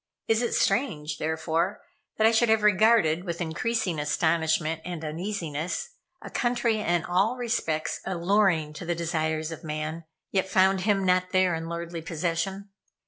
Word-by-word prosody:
Is 225 +1 +3
it 240 - 0
strange, 165 - 0
therefore, 160 +4 -1 0.3
that 220 - +3
I 225 - +6
should 230 0 +3
have 220 -1 +3
regarded 210 -5 +4
with 170 -3 -4
increasing 175 +1 -1
astonishment 160 +1 +1
and 175 -3 -6
uneasiness 175 - -3 0.3
a - - -8
country 240 -2 +1
in 175 -4 0
all 195 +7 +2
respects 195 -10 -2
alluring 180 -4 +1
to 165 - -8
the 175 - 0
desires 160 -1 -1
of 165 +1 -8
man 155 +1 -4 0.3
yet 190 -1 0
found 190 0 +3
him 195 -1 +1
not 185 0 +2
there 185 -1 +3
in 165 0 -4
lordly 170 0 -5
possession? 170 +5 -3
175 Hz, 150 wpm, -27 LUFS, 160-200 Hz, 0.3 s, I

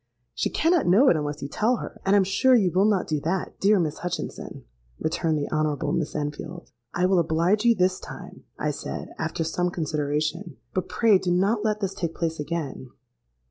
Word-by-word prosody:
—'She - - -1
cannot 335 - +2
know 215 +10 +6
it - - +4
unless 150 -1 -3
you - - -3
tell 220 - +1
her; - - -8
and 195 +1 +3
I - - +6
am 200 - +5
sure 200 +8 +3
you 195 -7 +3
will 190 +3 +3
not 200 -4 +1
do 155 -2 0
that, 175 +4 -3
dear 200 0 +4
Miss 155 -4 -2
Hutchinson,' 180 0 -5 0.3
returned 160 0 0
the 145 - -2
Honourable 155 -1 0
Miss 160 -3 -2
Enfield.—'I 150 0 -4
will 185 -1 +3
oblige 170 +7 +1
you 235 -1 +5
this 185 -1 +1
time,' - - -10
I - - -1
said, - - -6
after 165 - -2
some 175 +2 -1
consideration; 150 -1 -2 0.2
'but 185 - -2
pray 220 -5 +4
do 185 - -2
not 200 +5 +2
let 215 -1 0
this 195 -1 -1
take 170 -4 -4
place 165 -2 -2
again.' 150 -4 -4
175 Hz, 195 wpm, -25 LUFS, 155-195 Hz, 0.3 s, know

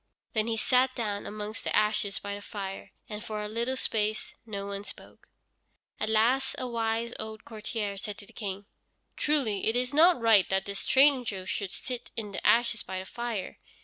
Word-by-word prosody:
Then 220 -1 +2
he 225 -1 0
sat 255 +3 +3
down 210 -4 -2
amongst 210 +1 -5
the - - -1
ashes 210 -1 +2
by 200 0 -4
the 205 - -6
fire, 195 -2 -6 0.2
and 210 0 -5
for 215 -2 -3
a - - -2
little 235 +4 -1
space 215 -3 0
no 200 -2 -4
one 200 0 -4
spoke. - - -10 0.7
At 215 - 0
last 245 +5 +3
a 255 - -2
wise 230 0 -1
old 220 0 -6
courtier 215 -2 -3
said 210 0 -5
to 205 - -7
the - - -15
King: 200 -2 -4 0.5
"Truly 260 -10 +2
it 220 - +3
is 250 +2 +1
not 335 +1 +6
right 225 -4 +5
that 190 0 +1
this 200 -1 -3
stranger 255 -9 +4
should 195 0 -2
sit 245 +5 -5
in 215 -3 -4
the - - -5
ashes 230 -1 +4
by 190 - -5
the 185 - -4
fire. 235 -3 -4
215 Hz, 190 wpm, -29 LUFS, 205-235 Hz, 0.7 s, not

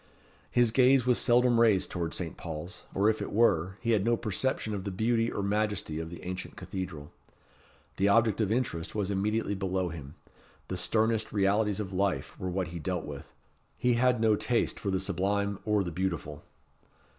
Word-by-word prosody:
His 120 -2 +3
gaze 130 +1 +5
was 125 -1 +3
seldom 120 -1 +4
raised 110 -5 +3
towards 85 -2 -3
Saint 85 -3 -4
Paul's, 85 +5 -7
or 100 +2 +3
if 110 0 +1
it - - -4
were, 95 -4 +2
he 115 - 0
had 105 -4 +3
no 115 +1 +2
perception 110 +1 -2
of 100 -2 -3
the 100 - -3
beauty 115 +4 +1
or 100 - -3
majesty 105 -6 -1
of 80 0 -5
the 85 - -10
ancient 90 +1 -5
cathedral. 90 -6 -6 0.9
The 100 - +3
object 110 +1 +3
of 105 -1 0
interest 110 -10 -2
was 100 -2 -1
immediately 105 +2 0
below 95 -2 -1
him. 75 -3 -9 0.5
The - - -2
sternest 110 0 +1
realities 105 +1 +1
of 100 -2 -4
life 95 0 -1
were 95 - -3
what 90 -1 -2
he 85 0 -6
dealt 90 0 -3
with. 70 -1 -8 0.5
He 125 0 +2
had 125 0 +3
no 110 -1 +4
taste 120 +3 0
for 100 - -3
the 95 -1 +1
sublime 100 +2 -1
or 105 -2 +2
the 85 - -4
beautiful. 80 -4 -3
100 Hz, 185 wpm, -29 LUFS, 90-110 Hz, 0.9 s, gaze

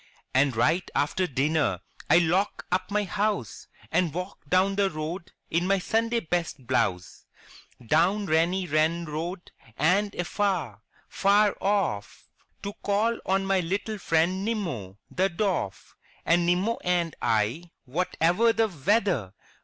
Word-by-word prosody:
And 135 -1 +3
right 160 +10 +1
after 180 +6 +1
dinner 145 +3 +1 0.3
I - - +7
lock 175 +4 +1
up 185 +1 0
my 210 +1 +1
house. 200 - -2 0.2
And 175 -4 +2
walk 180 +5 -5
down 190 +2 +3
the 200 -1 +2
road 165 +3 -5 0.2
in 170 +3 +1
my 195 0 +3
Sunday 230 +4 0
best 160 -5 -3
blouse; 90 -8 -1 0.6
Down 180 - +2
Reeny 175 +3 +1
Ren 160 +2 +1
Road 170 +4 -5 0.3
and 195 +6 +2
afar, 175 - -1 0.3
far 200 +1 +3
off, 195 - -1 0.4
To 200 - -4
call 215 +3 +1
on 195 +1 +1
my 195 -1 +2
little 200 +5 -2
friend 175 +3 +1
Nimmo, 165 - -3
the 190 +1 +1
Dwarf. 180 - -2 0.3
And 170 +1 +3
Nimmo 190 +6 +1
and 175 -2 0
I, 115 +11 0 0.2
whatever 180 - +2
the 225 -1 +1
weather. 175 - 0
180 Hz, 130 wpm, -26 LUFS, 155-200 Hz, 0.6 s, I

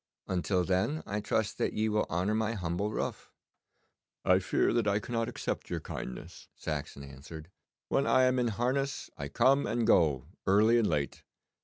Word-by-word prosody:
Until 90 0 0
then 95 - 0
I 105 +1 -2
trust 105 0 -1
that - - 0
ye 110 +1 0
will 105 0 +1
honour 90 +5 0
my 110 +1 0
humble 90 0 -2
roof.' - - -4 1.0
'I - - +5
fear - - +1
that 115 -3 +1
I 100 0 +3
cannot 115 +2 -2
accept - - -4
your - - -2
kindness,' 60 - -8
Saxon 75 -2 -5
answered. 75 +5 -10 0.4
'When 140 - +1
I 130 - +5
am 130 0 +3
in 120 - +2
harness 130 +5 -1
I 70 - -5
come 130 - +3
and 115 +2 0
go 75 - +3 0.2
early 110 +5 +5
and 110 - +2
late. 75 -3 -1
105 Hz, 170 wpm, -30 LUFS, 85-115 Hz, 1.0 s, I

